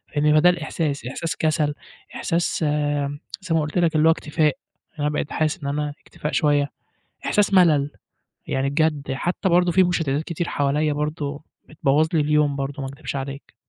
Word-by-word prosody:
يعني 150 +1 +3
بقى 155 0 +5
ده 180 - +7
الإحساس، 160 -5 -2
إحساس 165 +7 -3
كسل، 155 -2 +1 0.4
إحساس 170 +1 0 0.8
زي 180 -4 -1
ما 160 - +3
قُلت 150 +3 -3
لك 170 -2 +2
اللي 155 +1 +4
هو - - +7
اكتفاء، 155 -1 0 0.4
يعني 165 - -22
أنا 145 - +2
بقيت 150 -1 -3
حاسس 155 +2 -1
إن - - -3
أنا 145 0 -2
اكتفاء 150 - -6
شوية 145 -2 +2 0.6
إحساس 205 -1 +2
ملل، 155 -6 +5 0.6
يعني 135 +1 0
بجد 150 -2 0
حتى 175 +7 -1
برضه 175 0 +3
في 185 - +5
مششتتات 160 -4 0
كتير 170 +1 -3
حواليّا 145 +2 +1
برضه 150 0 -3 0.2
بتبوّظ 150 0 +2
لي 160 - +4
اليوم 150 -1 +2
برضه 140 +1 -4
ما 135 - -3
أكدبش 140 0 -6
عليك. 135 +1 -6
150 Hz, 175 wpm, -23 LUFS, 145-165 Hz, 0.8 s, ده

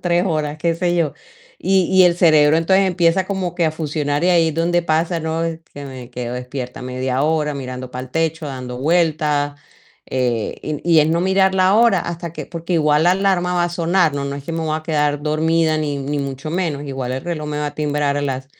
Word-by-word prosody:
3 175 0 +2
horas", 155 -3 -1
qué 170 +1 0
sé 175 +1 0
yo, 155 -5 +1 0.5
y 190 -1 +2
y 190 - +7
el 175 -1 +4
cerebro 155 -3 +5
entonces, 190 +4 +3
empieza 180 0 +2
como 185 -3 -3
que 170 -2 +1
a 155 - +1
funcionar 150 -1 -2
y 180 - +4
ahí 170 -2 +4
es 155 - -4
donde 175 +1 +1
pasa, 165 +1 0
¿no?, 160 +1 -2 0.3
que 145 0 -7
me 130 -2 -9
quedo 125 -1 -5
despierta 125 0 -6
media 130 +1 -2
hora 150 -1 +1
mirando 130 -1 -6
para 125 +1 -5
el - - -20
techo, 160 +1 -1
dando 125 -3 -6
vueltas, 150 -2 +1 0.5
eh, 120 -4 -1
y 150 -1 -3 0.2
y 160 - +7
es 150 - +2
no 165 +1 +1
mirar 190 +1 +3
la 185 +1 +4
hora 225 -4 +5
hasta 170 -1 -5
que - - -7
porque 170 +1 -4
igual 150 -2 +3
la 175 - +5
alarma 185 -2 +1
va 175 - +2
a 175 - 0
sonar, 170 -2 +1
no 140 -1 -2
no 140 0 -4
es 140 - -9
que 165 - -5
me 165 - -2
voy 155 -1 -1
a 155 - -6
quedar 150 -2 0
dormida 155 +1 +1
ni 145 -2 -2
ni 145 +2 -3
mucho 140 +2 -5
menos, 160 -5 -2
igual 135 -3 -4
el 130 - -4
reloj 165 -3 -4
me 150 - -3
va 150 - -1
a 145 - -5
timbrar 145 -1 0
a 145 - -1
las 135 -2 -3
155 Hz, 230 wpm, -19 LUFS, 145-170 Hz, 0.5 s, y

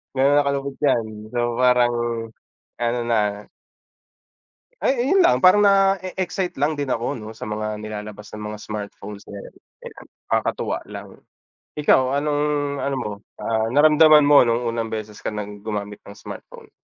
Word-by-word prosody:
ganon 140 +2 +3
na 145 - +1
kalupit 140 -1 -3
'yan. 120 -6 +2 0.3
So, 120 0 -1
parang 125 -1 +4 0.9
ano 120 0 0
na 105 -3 0 1.4
Ay, 255 -1 +1
ayun 380 +5 +4
lang, 345 - +4
parang 185 +3 +6
na-eexcite 195 -3 +1
lang 150 +2 +1
din 145 -2 -3
ako 115 0 -1
'no, 110 -1 -8
sa 110 - -8
mga 105 0 -4
nilalabas 105 0 -8
ng 105 - -7
mga 105 - -8
smartphones 105 -1 -8
na, 100 - -9
'yan. - - -12 0.3
Ayan. - - -13 0.2
Kakatuwa - - -1
lang. - - -9 0.7
Ikaw 135 -2 +3
anong, 145 0 0 0.4
ano 140 0 -1
mo, 110 -5 -3 0.3
ah, 110 0 -1
naramdaman 150 +2 +6
mo 145 0 +7
nung 120 0 +1
unang 115 -1 -2
beses 110 -1 -6
ka - - -3
ng 105 -1 -7
gumamit 105 -1 -5
ng 100 - -12
smartphone? - - -11
120 Hz, 155 wpm, -22 LUFS, 105-145 Hz, 1.4 s, mo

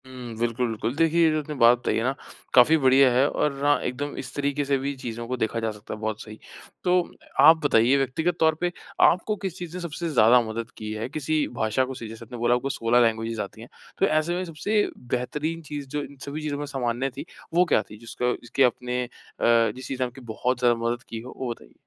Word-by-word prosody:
हुँ, 125 -3 -8
बिल्कुल, 120 +2 0
बिल्कुल। 115 +2 -3
देखिए, 165 +2 +3
ये 160 - +4
जो 155 - +1
आपने 150 0 -6
बात 120 -1 +6
बताई 120 - -1
है 115 - 0
ना 130 +2 +1 0.4
काफ़ी 140 +6 +7
बढिया 135 -1 +5
है 130 +3 +4
और 140 -2 -1
हाँ 145 0 +4
एकदम 140 +4 -3
इस 130 - -6
तरीक़े 145 0 0
से 140 0 +2
भी 140 +1 -3
चीज़ों 120 -2 -6
को 130 +1 -2
देखा 115 0 -1
जा 115 -1 -1
सकता 105 +1 -9
है 110 - -7
बहुत 110 0 -3
सही। 110 0 -10 0.4
तो 180 0 +3 0.4
आप 160 +4 +8
बताइए 125 0 +4
व्यक्तिगत 160 +6 0
तौर 160 -1 +4
पे 175 0 +1 0.3
आपको 200 +4 +4
किस 190 -2 -3
चीज़ 175 -1 -7
ने - - -6
सबसे 170 0 -4
ज़्यादा 120 -3 +6
मदद 115 +2 -5
की 110 0 -6
है 110 +2 -4
किसी 155 +1 -1
भाषा 110 +4 +1
को 130 - -6
सीखने 120 -4 -8
जैसे 115 +1 -11
आपने 120 +2 -9
बोला 120 +1 +2
आपको 135 +3 -2
16 120 -2 +2
लैंग्वेजेज़ 115 -1 0
आती 105 +2 -8
हैं। 115 - -11 0.3
तो - - +4
ऐसे 155 0 +1
में 180 - -2
सबसे 205 +6 0 0.2
बेहतरीन 135 +7 -3
चीज़ 145 -3 -7
जो 145 +2 -3
इन 140 - -11
सभी 145 +2 -5
चीज़ों 150 -2 -3
में 145 - -3
सामान्य 130 -2 -2
थी 145 - -5 0.3
वो 180 +2 +5
क्या 165 - +3
थी 105 - -9
जिसका 120 +2 -2
जिसके 120 +3 +1
आपने 125 0 0
अ, - - -6 0.7
जिस 130 0 -8
चीज़ 130 -1 -4
ने - - +3
आपकी 125 +2 -13
बहुत 125 +2 -1
ज़्यादा 120 -1 +4
मदद 120 +1 -1
की 115 - -5
हो 125 - -10
वो 130 -2 -3
बताइए? 115 - -10
130 Hz, 240 wpm, -25 LUFS, 120-150 Hz, 0.7 s, आप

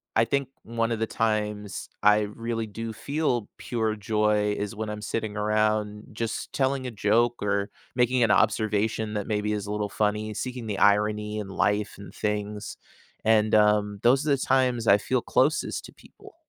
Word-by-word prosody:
I 115 - +4
think 135 +3 -1
one 115 0 -1
of 115 - -1
the 110 - 0
times 105 -2 -2 0.2
I 105 0 +6
really 115 +2 -3
do 115 +2 -5
feel 140 -4 -1
pure 110 -3 -1
joy 105 0 +1
is 105 +1 -4
when 110 0 -4
I'm 105 0 -5
sitting 110 0 -3
around 105 0 0
just 115 +1 -4
telling 135 -1 0
a - - -4
joke 115 +3 +2
or 100 0 0 0.3
making 125 0 +3
an 105 - +3
observation 110 0 +1
that 105 -1 -3
maybe 105 -1 0
is 105 -1 -3
a - - -4
little 105 0 -1
funny, 105 +1 -1
seeking 125 +1 -4
the 100 -2 -3
irony 105 +1 +2
in 105 - -5
life 105 +2 0
and 100 - -11
things 105 0 -3 0.5
and, 110 -1 +3
um, 105 -1 +3
those 130 +5 +4
are 150 - +1
the 140 - +4
times 130 -3 +1
I 100 - +7
feel 125 +4 -1
closest 145 +5 +1
to - - -13
people. - - -17
105 Hz, 180 wpm, -26 LUFS, 105-115 Hz, 0.5 s, I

